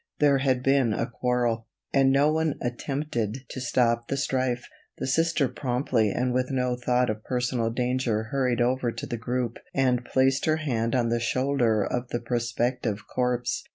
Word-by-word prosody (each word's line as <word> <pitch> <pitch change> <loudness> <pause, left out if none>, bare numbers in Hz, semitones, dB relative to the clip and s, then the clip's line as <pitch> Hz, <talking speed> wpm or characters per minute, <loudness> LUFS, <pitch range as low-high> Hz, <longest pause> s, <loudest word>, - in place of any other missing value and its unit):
There 140 -2 +4
had 130 -2 +1
been 135 -4 +3
a 115 - 0
quarrel, 120 -2 -1 0.3
and 135 -1 +4
no 140 +3 +4
one 160 -1 0
attempted 125 -1 -3
to 130 - -6
stop 120 -2 +1
the 140 - -1
strife. 130 -3 -1 0.3
The - - -3
Sister 155 +1 +2
promptly 125 -4 0
and 125 +4 0
with 125 0 0
no 125 -2 0
thought 125 -1 +1
of 110 0 -7
personal 125 -2 -1
danger 125 -2 0
hurried 125 -3 +1
over 125 0 +1
to - - -6
the 120 - -4
group 120 +1 -2 0.2
and 125 -2 +2
placed 130 +2 +2
her 155 0 +2
hand 120 -6 -1
on 120 -2 +2
the 120 0 +1
shoulder 120 -3 +1
of 125 +4 -2
the 120 - -2
prospective 120 -2 -1
corpse. 125 -1 -1
125 Hz, 170 wpm, -26 LUFS, 120-135 Hz, 0.3 s, There